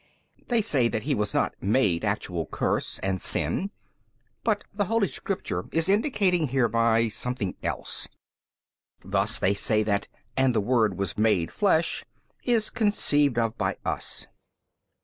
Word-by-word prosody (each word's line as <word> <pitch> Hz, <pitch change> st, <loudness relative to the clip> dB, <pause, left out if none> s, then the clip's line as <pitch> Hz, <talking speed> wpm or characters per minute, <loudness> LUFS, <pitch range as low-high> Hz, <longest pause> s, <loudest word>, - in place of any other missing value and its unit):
They 235 Hz, -3 st, +2 dB
say 135 Hz, -, +2 dB
that 110 Hz, -2 st, -2 dB
He 145 Hz, -, 0 dB
was 105 Hz, -5 st, -1 dB
not -, -, +1 dB
MADE 100 Hz, -4 st, +2 dB
actual -, -, -2 dB
curse -, -, -1 dB
and 95 Hz, -1 st, -1 dB
sin, 195 Hz, -, 0 dB, 0.7 s
but 215 Hz, -3 st, +1 dB
the 205 Hz, 0 st, 0 dB
holy 225 Hz, 0 st, +2 dB
Scripture 185 Hz, +6 st, -4 dB
is 165 Hz, +1 st, +1 dB
indicating 195 Hz, -, +2 dB
hereby 115 Hz, -3 st, +2 dB
something 110 Hz, -2 st, -2 dB
else: -, -, -3 dB, 1.0 s
thus 100 Hz, +3 st, 0 dB
they 95 Hz, -, +2 dB
say 110 Hz, +2 st, +1 dB
that 100 Hz, -1 st, 0 dB, 0.3 s
And 130 Hz, -2 st, +2 dB
the -, -, +4 dB
Word 110 Hz, -3 st, +2 dB
WAS 100 Hz, -1 st, -2 dB
MADE 105 Hz, -7 st, +2 dB
flesh 170 Hz, -6 st, +1 dB, 0.4 s
is 230 Hz, -3 st, +2 dB
conceived 145 Hz, -, +2 dB
of 115 Hz, -1 st, +1 dB
by -, -, 0 dB
us. -, -, -3 dB
125 Hz, 140 wpm, -26 LUFS, -, 1.0 s, the